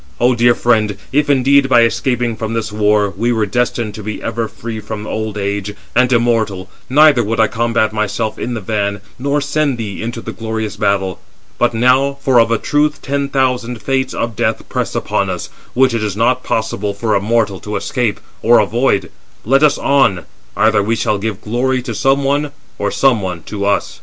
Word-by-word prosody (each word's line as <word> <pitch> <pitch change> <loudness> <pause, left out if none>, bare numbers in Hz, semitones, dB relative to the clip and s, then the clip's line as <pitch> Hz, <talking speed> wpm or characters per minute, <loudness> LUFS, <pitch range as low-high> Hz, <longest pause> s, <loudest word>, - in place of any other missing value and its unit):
O 125 +1 +4
dear 120 0 +4
friend, 110 -4 +1
if 145 +1 +1
indeed, 140 0 +4
by 120 -2 +6
escaping 120 0 0
from 110 +1 -4
this 110 -2 -2
war, 105 -1 +2
we 115 +5 0
were 110 -3 +1
destined 120 0 -1
to 105 - -8
be 105 +1 -5
ever 115 0 -2
free 115 0 -7
from 105 0 -6
old 110 -1 -4
age, 100 0 -3 0.2
and 125 0 +3
immortal, 110 -6 +1 0.2
neither 145 -2 +5
would 115 +2 -2
I 110 - +6
combat 115 -1 0
myself 110 +1 -2
in 120 - -3
the 110 - -4
van, 100 -1 -2 0.2
nor 140 +2 0
send 145 -2 0
thee 105 -4 -5
into 115 +1 -4
the 115 - -6
glorious 110 -2 -4
battle. 95 -2 0 0.4
But 120 -1 +2
now—for 130 +2 +3
of 115 - +4
a 115 - +2
truth 150 +5 0
ten 140 0 -1
thousand 125 -4 -1
Fates 130 -1 -1
of 115 -1 -2
death - - -1
press - - -2
upon - - -1
us, - - -4 0.3
which 130 0 +4
it 115 - -1
is 105 -2 -3
not 125 +3 +2
possible 105 -2 -2
for 110 +1 -1
a 100 - +2
mortal 105 -2 0
to 105 0 -6
escape 105 +2 -1 0.2
or 120 +1 +5
avoid—let 120 +3 0
us 150 -2 +4
on: 115 - +2 0.3
either 110 -1 +3
we 110 +3 0
shall 105 -2 0
give 105 0 -4
glory 125 +3 -1
to 120 -2 -4
some 135 +6 +1
one, 145 +1 0 0.3
or - - 0
some 130 -6 +2
one 90 -3 -4
to 100 -1 -4
us." 100 - -1
115 Hz, 190 wpm, -16 LUFS, 105-125 Hz, 0.4 s, by